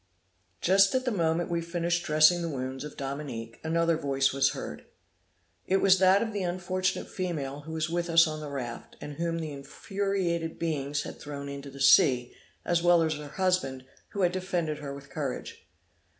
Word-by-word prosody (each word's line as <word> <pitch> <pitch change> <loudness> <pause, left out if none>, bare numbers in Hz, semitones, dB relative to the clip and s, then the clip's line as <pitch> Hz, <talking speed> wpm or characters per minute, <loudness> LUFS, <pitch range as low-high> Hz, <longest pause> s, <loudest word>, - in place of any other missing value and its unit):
Just 195 +4 +5
at 255 0 +1
the 250 - +1
moment 170 -3 0
we 170 0 0
finished 170 +1 -1
dressing 155 +3 +5
the 170 - -2
wounds 130 -2 -4
of 150 - -8
Dominique, 135 -5 -5
another 165 0 +2
voice 135 -3 +1
was 135 0 +2
heard. - - -7 0.8
It 190 - +3
was 190 -1 +5
that 190 +3 +5
of 225 -2 -4
the 205 - -2
unfortunate 185 +1 -1
female 150 -7 -4
who 160 - -5
was 160 0 -1
with 170 +1 -2
us 165 0 +7
on 155 -1 -4
the 150 -1 -6
raft, 125 -4 -6
and 145 -1 -8
whom 165 0 -1
the 160 -2 -4
infuriated 170 +3 -2
beings 145 -3 -2
had - - -8
thrown 140 -1 -7
into 140 0 -7
the 140 0 -11
sea, 130 -2 +5 0.3
as 175 -1 +2
well 175 -1 +5
as 160 -1 +1
her 150 -1 -7
husband, 150 -6 0 0.2
who 200 - -4
had 175 - +4
defended 175 -4 -2
her 145 -2 -6
with 140 0 -10
courage. 140 -4 -5
160 Hz, 185 wpm, -28 LUFS, 140-175 Hz, 0.8 s, us